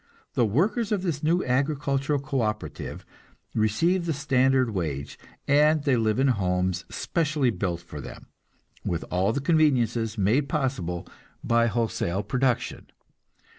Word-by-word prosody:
The 120 - +2
workers 205 - +1
of 200 -3 0
this 160 -6 -2
new 170 +4 +1
agricultural 140 +2 0
co 140 -1 -2
operative 105 -1 -4 0.5
receive 165 - +1
the 160 - +1
standard 130 -2 +2
wage, 75 -8 -4 0.3
and 150 +1 +4
they 140 -4 +3
live 110 -2 +1
in 135 +1 +3
homes 90 -5 0
specially 150 -6 0
built 90 -6 -2
for 75 -4 -9
them, - - -10 0.6
with 85 -1 -2
all 95 +3 +2
the 140 - -1
conveniences 120 -8 +2
made 115 +9 +2
possible 100 - -2 0.4
by 115 0 +3
wholesale 110 -5 -1
production. 125 +3 -1
130 Hz, 135 wpm, -26 LUFS, 105-145 Hz, 0.6 s, and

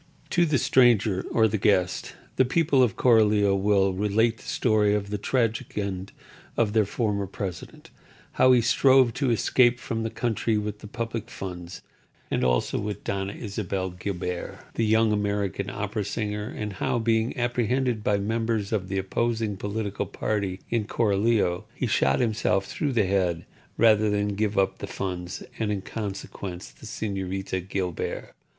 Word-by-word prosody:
To 175 -1 +3
the 150 -2 +2
stranger 115 -6 +4
or 110 -1 +4
the 110 0 -1
guest 95 -2 +1 0.2
the - - +5
people 145 +1 +2
of 120 -6 +3
Coralio 105 -4 +4
will 100 -1 +2
relate 105 +4 +1
the - - -15
story 105 -3 +2
of 100 -1 -3
the 105 - -2
tragic 115 -1 -1
end 100 -2 -3 0.5
of 110 -3 +2
their 110 -2 +4
former 100 -3 -1
president; 90 -2 -7 0.4
how 130 - +5
he 125 -1 +6
strove 130 +1 +4
to 135 +1 0
escape 120 +2 +3
from 115 -1 -3
the 115 - -2
country 115 -1 0
with 105 0 -3
the 105 - -10
public 115 0 -4
funds 90 -3 -7 0.5
and - - 0
also 60 -1 +1
with 105 0 -4
Doña 100 0 -3
Isabel 100 -3 -3
Guilbert, 90 -1 -5
the 115 - 0
young 110 0 +4
American 100 -2 -1
opera 105 - -3
singer; 105 0 -3
and 105 -2 -5
how, 95 - -1
being 115 +1 +1
apprehended 120 -1 0
by 105 - +2
members 110 0 -1
of 100 -4 -1
the 95 +1 -2
opposing 110 +2 -1
political 105 +1 -3
party 100 -3 -2
in 115 -3 +1
Coralio, 105 -4 +1
he - - -2
shot 70 0 +2
himself 110 -4 +1
through 145 +7 -2
the 110 -4 +3
head 90 -3 0 0.3
rather 110 -2 +5
than 105 0 0
give 105 +1 -1
up 95 -1 +1
the - - -5
funds, 90 -1 -5 0.2
and, 110 -2 0
in 100 -2 -2
consequence, 100 -4 -6
the - - -13
Señorita 95 -2 -3
Guilbert. 90 -4 -3
105 Hz, 160 wpm, -26 LUFS, 95-115 Hz, 0.5 s, he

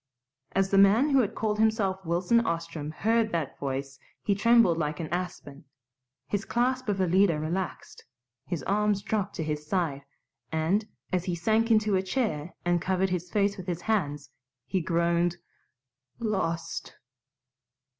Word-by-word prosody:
As 195 0 +1
the 195 - +5
man 220 +9 +5
who 275 - +5
had 220 -6 0
called 210 -1 -1
himself 210 -4 +1
Wilson 175 +7 +2
Ostrom 165 -5 -3
heard 220 +7 +1
that 165 -5 -3
voice 135 0 -4 0.2
he 205 - +2
trembled 215 -4 +4
like 150 +1 -2
an 165 - -3
aspen; 170 -4 -5 0.6
his 205 0 -2
clasp 255 +1 0
of 200 -1 0
Alida 185 -2 +3
relaxed, 170 +4 -4 0.4
his 170 -7 -3
arms 205 +2 +1
dropped 205 -2 -2
to 165 - -2
his 150 -1 -3
side, 160 -6 -1 0.5
and, 170 +7 +1 0.3
as 180 -1 +1
he 180 - -1
sank 220 +6 +1
into 215 -2 +3
a 185 - +2
chair 190 - -2
and 175 -1 +2
covered 190 +1 0
his 180 -1 -2
face 200 0 +1
with 185 -1 -8
his 175 -1 -2
hands, 150 -10 -1 0.3
he 190 - -1
groaned, 170 +1 +1 0.8
"Lost!" 170 -7 -2
185 Hz, 150 wpm, -28 LUFS, 165-210 Hz, 0.8 s, the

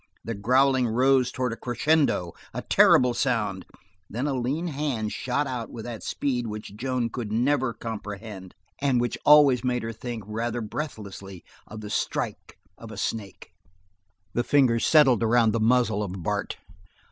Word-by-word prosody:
The 115 - -4
growling 130 +4 +3
rose 130 +2 +3
towards 125 -2 -2
a - - -9
crescendo, 130 - +1 0.2
a - - -4
terrible 125 -1 +5
sound; 105 -8 -1 0.4
then 120 +6 -3
a 145 - 0
lean 135 +7 -2
hand 135 -9 -2
shot 130 +4 -1
out 125 -4 -4
with 115 -2 -8
that 120 -2 -6
speed 125 -4 -2
which 105 -1 -7
Joan 125 0 -2
could 115 -4 -5
never 130 +3 +1
comprehend 105 -4 -7 0.2
and 135 -3 +2
which 120 0 -1
always 145 -5 +7
made 125 -2 0
her 115 0 -4
think, 115 -1 -6
rather 115 +3 -3
breathlessly, 105 - -7 0.2
of 110 0 -9
the 105 -1 -7
strike - - -3 0.2
of 115 - -10
a 110 - -9
snake. 100 -5 -5 0.8
The 120 - 0
fingers 125 -5 +3
settled 140 -7 +5
around 115 0 +3
the 115 - -1
muzzle 110 -2 +2
of 100 -3 -4
Bart. - - -2
120 Hz, 160 wpm, -26 LUFS, 110-130 Hz, 0.8 s, always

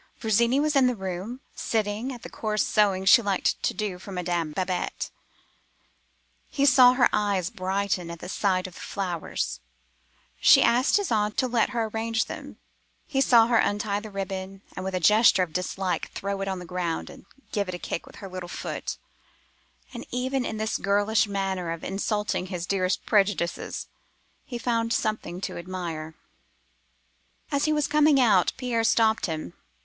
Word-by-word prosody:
Virginie 235 +4 +2
was 300 0 +1
in 265 -2 +5
the 250 - 0
room, 190 +6 -5
sitting 220 +3 -1
at 245 -3 -9
the - - -6
coarse 215 -1 -1
sewing 195 -3 +2
she 235 +5 +8
liked 200 -4 0
to - - +1
do 205 -4 -4
for 195 - -10
Madame 175 -3 -2
Babette. 180 +2 -3 1.4
He 280 - +1
saw 255 -3 +7
her 250 -1 +4
eyes 200 -4 0
brighten 190 -3 -2
at 170 - -6
the 170 - -9
sight 185 -1 0
of 185 - -7
the - - -12
flowers: 165 - -3 0.8
she - - +7
asked 250 +10 +3
his 405 -7 -2
aunt 210 -1 +1
to - - +2
let 235 -2 +1
her 235 -2 -1
arrange 225 +1 -1
them; - - -8 0.5
he 270 - 0
saw 235 -4 +6
her 230 -1 +3
untie 205 0 0
the 215 +1 -9
ribbon, 195 -1 -5
and 185 - -5
with 190 0 -3
a - - 0
gesture 210 +1 +5
of 165 -3 -6
dislike, 180 0 -2
throw 200 0 -3
it 195 - -2
on 190 -1 -2
the 180 - -8
ground, 175 -1 -3
and - - -15 0.2
give 200 -3 -1
it 180 - -3
a - - -4
kick 170 - -5
with - - -14
her 195 - -8
little 185 -1 -7
foot, - - -5 1.0
and 240 - -6
even 255 +1 -1
in 220 - -4
this 220 0 -1
girlish 205 +2 +2
manner 195 -3 -2
of 165 -1 -6
insulting 205 -1 -1
his 180 -2 -4
dearest 185 -1 0
prejudices, 195 -5 0 0.6
he 245 - -5
found 230 -1 0
something 215 -6 -2
to 190 -2 -5
admire. 170 -3 -5 1.4
"As 280 -1 +1
he 310 - +2
was 300 -1 +2
coming 300 -1 +4
out, 210 -8 +4
Pierre 245 -3 -1
stopped 225 -2 +3
him. 155 - -5
200 Hz, 175 wpm, -26 LUFS, 185-230 Hz, 1.4 s, she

